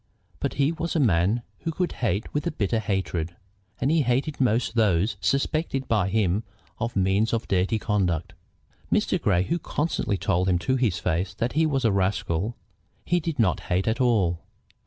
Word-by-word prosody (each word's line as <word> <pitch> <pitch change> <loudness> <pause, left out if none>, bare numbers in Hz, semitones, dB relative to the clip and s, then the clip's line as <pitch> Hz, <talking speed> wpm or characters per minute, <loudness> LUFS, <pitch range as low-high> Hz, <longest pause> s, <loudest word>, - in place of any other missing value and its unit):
But - - -2
he 140 +2 +2
was 170 +1 -3
a - - +3
man 105 - +2 0.2
who 165 - -4
could 180 +2 -1
hate 105 -2 -1
with 150 +3 -1
a - - 0
bitter 110 -4 0
hatred, 85 -5 -2 0.4
and 135 +3 +1
he 165 -1 +4
hated 135 +3 0
most 120 -2 +2
those 105 -2 +2
suspected 140 -1 0
by 105 -4 +2
him 100 -1 +1 0.4
of 115 +1 -2
mean 95 +3 +2
or 115 - +2
dirty 95 +4 +1
conduct. 95 -7 -1 0.6
Mr. - - +1
Grey, 90 +1 +3
who 170 - -1
constantly 150 -11 -1
told 95 0 +1
him 90 - +3
to 130 +9 0
his 120 -8 +1
face 90 +2 -1
that 120 +1 -1
he 160 +2 +3
was 135 -5 0
a 110 - +4
rascal, 95 +1 0 0.5
he 175 - +2
did 165 -2 -3
not 110 -7 +2
hate 90 +3 +1
at 115 +4 +1
all. 100 -9 +2
110 Hz, 180 wpm, -25 LUFS, 95-135 Hz, 0.6 s, he